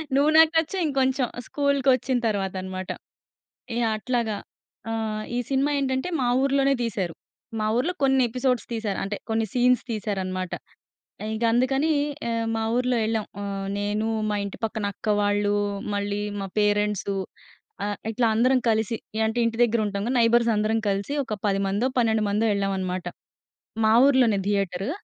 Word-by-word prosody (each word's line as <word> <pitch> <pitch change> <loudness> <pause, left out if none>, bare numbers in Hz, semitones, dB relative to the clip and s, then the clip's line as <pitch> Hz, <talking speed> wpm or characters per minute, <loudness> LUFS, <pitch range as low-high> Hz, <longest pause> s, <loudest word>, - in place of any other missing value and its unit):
'నువ్వు 285 +2 +4
నాకు 320 0 +7
నచ్చావ్' 335 +3 0
ఇంకొంచెం 265 -2 +1 0.2
స్కూల్‌కొచ్చిన 270 -3 +2
తర్వాత 195 -3 -1
అన్నమాట. 185 0 -6 0.9
ఏ - - +1 0.2
అట్లాగా 225 -1 -1 0.5
ఆ! - - -1 0.4
ఈ - - +1
సినిమా 275 +2 +1
ఏంటంటే 265 +4 -1
మా 245 - +1
ఊర్లోనే 275 0 +3
తీశారు. 195 -7 -2 0.5
మా 215 - 0
ఊర్లో 310 +10 +1
కొన్ని 270 -1 +4
ఎపిసోడ్స్ 250 0 0
తీశారు, 215 -3 -2
అంటే 200 +1 -3
కొన్ని 225 0 +1
సీన్స్ 250 0 +3
తీశారన్నమాట. 185 -4 -3 0.8
ఇంక 220 +2 -2
అందుకని 270 +5 +2 0.4
ఆహ్, 230 0 -1
మా 225 - -1
ఊర్లో 250 0 +1
ఎళ్ళాం, 220 -1 0 0.2
ఆహ్, 195 -1 -4
నేను, 210 +2 -1 0.2
మా 210 - 0
ఇంటి 200 - -7
పక్కన 220 -1 -2
అక్క 200 - -14
వాళ్ళు, 205 0 +1 0.4
మళ్ళీ 205 0 -1 0.2
మా 195 - -3
పేరెంట్సు, 205 -1 +1 0.7
ఆహ్, 205 0 -2
ఇట్లా 230 +1 +1
అందరం 255 +3 +4
కలిసి 220 +1 0 0.2
ఏ - - 0
అంటే 225 +2 -2
ఇంటి 230 0 -2
దగ్గర 235 -1 +1
ఉంటాం 200 0 -3
క. - - 0
నైబర్స్ 235 0 +4
అందరం 215 +2 +1
కలిసి 200 +8 -1
ఒక 215 - -4
పదిమందో, 200 +4 +1
12 220 -2 +2
మందో 215 +2 +1
ఎళ్ళాం 195 -1 0
అన్నమాట. 185 -1 -3 0.8
మా 220 - +5
ఊర్లోనే 250 -7 +4
థియేటరు. 195 +1 -1
220 Hz, 150 wpm, -25 LUFS, 205-255 Hz, 0.9 s, నాకు